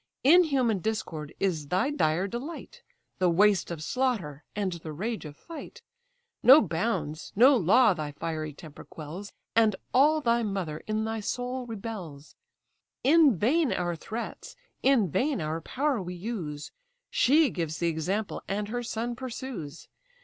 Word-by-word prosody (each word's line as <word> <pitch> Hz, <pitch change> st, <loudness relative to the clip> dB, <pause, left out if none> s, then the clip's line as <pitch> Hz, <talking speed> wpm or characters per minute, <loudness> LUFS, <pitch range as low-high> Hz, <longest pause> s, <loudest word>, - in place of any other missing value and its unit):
Inhuman 275 Hz, -, +4 dB
discord 165 Hz, -8 st, -3 dB
is 165 Hz, -7 st, -1 dB
thy 190 Hz, -, +1 dB
dire 170 Hz, -, +1 dB
delight, 305 Hz, -, -7 dB, 0.4 s
The 180 Hz, -1 st, +3 dB
waste 200 Hz, +2 st, +3 dB
of 165 Hz, -3 st, -5 dB
slaughter, 190 Hz, -, -1 dB
and 200 Hz, -2 st, -1 dB
the 165 Hz, -2 st, -7 dB
rage 210 Hz, +6 st, -4 dB
of 150 Hz, -1 st, -9 dB
fight. 405 Hz, +8 st, -10 dB, 0.6 s
No 265 Hz, +6 st, +9 dB
bounds, 165 Hz, -, -2 dB
no 255 Hz, +7 st, +7 dB
law, 220 Hz, +2 st, +5 dB
thy 155 Hz, -4 st, -5 dB
fiery 155 Hz, +1 st, -4 dB
temper 150 Hz, 0 st, -12 dB
quells, 170 Hz, +7 st, -8 dB, 0.2 s
And 220 Hz, -3 st, +4 dB, 0.2 s
all 295 Hz, +5 st, +5 dB
thy 235 Hz, -4 st, +2 dB
mother 195 Hz, -8 st, -3 dB
in 215 Hz, 0 st, -1 dB
thy 225 Hz, 0 st, -2 dB
soul 245 Hz, +3 st, -3 dB
rebels. 195 Hz, -10 st, -7 dB, 0.7 s
In 290 Hz, -, +5 dB
vain 280 Hz, -, +2 dB
our 175 Hz, -1 st, -1 dB
threats, 220 Hz, +8 st, -7 dB, 0.3 s
in 260 Hz, -7 st, +4 dB
vain 280 Hz, -, +1 dB
our 160 Hz, +1 st, -3 dB
power 270 Hz, -, -1 dB
we 180 Hz, 0 st, -6 dB
use; 175 Hz, -7 st, -5 dB, 0.4 s
She 290 Hz, +1 st, +4 dB
gives 165 Hz, -3 st, -3 dB
the 170 Hz, -, +1 dB
example, 185 Hz, +7 st, -2 dB
and 205 Hz, +1 st, -2 dB
her 245 Hz, +2 st, -2 dB
son 235 Hz, 0 st, -3 dB
pursues. 235 Hz, -, -7 dB
210 Hz, 145 wpm, -28 LUFS, 165-250 Hz, 0.7 s, No